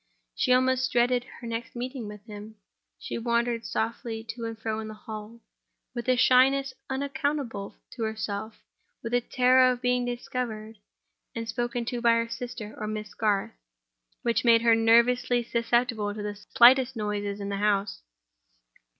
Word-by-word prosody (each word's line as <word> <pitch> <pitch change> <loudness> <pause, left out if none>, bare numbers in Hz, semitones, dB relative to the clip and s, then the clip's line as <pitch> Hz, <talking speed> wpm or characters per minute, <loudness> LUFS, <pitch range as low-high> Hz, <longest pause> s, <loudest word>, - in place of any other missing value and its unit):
She 255 - 0
almost 255 0 +3
dreaded 245 0 +2 0.2
her - - -8
next 230 +1 -5
meeting 250 -1 -5
with 210 0 -10
him. 210 0 -10 0.4
She - - -5
wandered 235 0 0
softly 225 0 -3
to 230 0 -5
and 225 -1 -5
fro 220 0 -3
in 220 - -5
the 215 - -8
hall, 215 +2 -9 0.5
with 240 0 -4
a 255 - +5
shyness 265 +2 +4 0.2
unaccountable 275 -6 -3 0.2
to 245 - -9
herself; 220 -1 -4 0.4
with 230 0 -5
a 245 - +3
terror 255 +1 +4
of 250 - -3
being 250 0 +1
discovered 240 -3 -4 0.6
and 230 -1 -4
spoken 240 +1 -2
to 245 0 -3
by 235 -1 +5
her 230 0 +1
sister 230 -2 -6
or 215 - -3
Miss 215 0 -5
Garth, 205 -3 0 0.7
which 235 -1 +1
made 230 -1 +5
her 230 -1 +6
nervously 240 +2 +3
susceptible 235 -3 0
to 210 - -5
the 205 0 -3 0.2
slightest 260 +1 +7
noises 205 -2 -3
in 200 0 -4
the 200 - -2
house. 205 0 0
235 Hz, 160 wpm, -27 LUFS, 215-250 Hz, 0.7 s, slightest